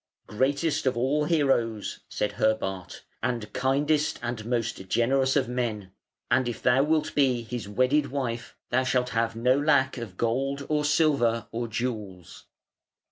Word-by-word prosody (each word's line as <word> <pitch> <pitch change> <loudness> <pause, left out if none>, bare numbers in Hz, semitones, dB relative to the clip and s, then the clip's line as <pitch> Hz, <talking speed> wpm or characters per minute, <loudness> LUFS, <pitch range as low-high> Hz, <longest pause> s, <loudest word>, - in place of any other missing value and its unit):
"Greatest 140 +6 0
of 125 - +1
all 140 +5 +1
heroes", 135 -9 0
said 105 - -1
Herbart, 100 -3 -2 0.2
"and 115 -2 -3
kindest 145 +3 +1
and 120 -2 -3
most 115 -6 -2
generous 130 +4 +2
of 135 -3 +2
men; 115 -6 -3 0.4
and 130 0 +3
if 120 - -7
thou 125 +2 +4
wilt 155 +2 +1
be 130 -4 +2
his 115 -3 -6
wedded 130 +7 +2
wife 125 -4 -4
thou 130 +2 +3
shalt 125 -1 +1
have 115 0 0
no 125 +4 +2
lack 140 -3 +2
of 105 -6 -8
gold 135 +4 -1
or 150 -1 +1
silver 140 -7 +2
or 120 +1 -3
jewels". 105 -7 -5
125 Hz, 145 wpm, -27 LUFS, 115-140 Hz, 0.4 s, thou